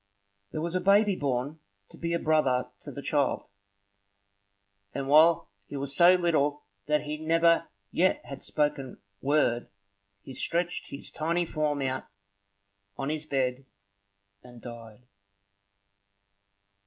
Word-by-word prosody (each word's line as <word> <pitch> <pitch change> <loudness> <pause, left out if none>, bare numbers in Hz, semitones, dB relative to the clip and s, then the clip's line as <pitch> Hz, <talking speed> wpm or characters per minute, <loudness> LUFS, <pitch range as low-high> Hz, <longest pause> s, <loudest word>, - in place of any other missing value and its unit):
There 155 - -3
was 170 +1 -3
a 185 - 0
baby 200 0 +4
born 140 +1 -2 0.3
to - - -14
be 170 0 -2
a - - +2
brother 150 -6 +1
to - - -8
the 140 - -8
child; 145 -3 0 1.5
and 135 -1 -3
while 160 +1 +5 0.2
he 145 - -6
was 140 0 -4
so 175 +3 +7
little 150 -5 +1 0.2
that 150 0 +2
he 150 +1 -4
never 165 +1 +3 0.2
yet 185 +2 +2
had 140 -1 -8
spoken 145 -3 -1 0.2
word, 135 -4 +1 0.5
he 135 - -9
stretched 170 +6 -1
his 140 - -7
tiny 170 +3 0
form 150 -3 -1
out 130 0 -2 0.9
on 135 - -2
his 155 0 -3
bed 130 -1 -1 0.7
and 120 +1 -14
died. 115 -1 -11
150 Hz, 130 wpm, -28 LUFS, 135-165 Hz, 1.5 s, so